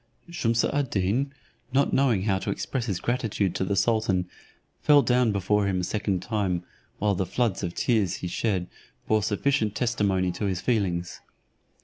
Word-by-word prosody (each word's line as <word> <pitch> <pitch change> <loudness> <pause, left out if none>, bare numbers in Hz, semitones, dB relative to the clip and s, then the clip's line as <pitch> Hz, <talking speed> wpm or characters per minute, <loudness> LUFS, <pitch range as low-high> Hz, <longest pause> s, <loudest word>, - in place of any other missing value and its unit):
Shumse 115 -8 +1
ad 145 -3 0
Deen, 110 +9 0 0.4
not 140 +1 +2
knowing 125 -8 +3
how 95 -2 +1
to - - -4
express 125 -3 -2
his 95 -5 -1
gratitude 115 -6 -1
to - - -1
the 100 +1 0
sultan, 100 -4 +1 0.5
fell 145 -2 +6
down 125 -2 +3
before 100 +1 +1
him 95 -2 0
a - - -4
second 100 -1 -1
time, 95 -6 -1 0.3
while 105 0 +1
the 95 - 0
floods 110 +1 0
of 90 -3 -4
tears 110 -7 +1
he 90 - -5
shed 95 0 -1 0.4
bore 110 0 +3
sufficient 110 +1 0
testimony 100 -6 +1
to 90 +4 -4
his 95 -3 -1
feelings. 90 -7 -1
105 Hz, 165 wpm, -26 LUFS, 95-120 Hz, 0.5 s, fell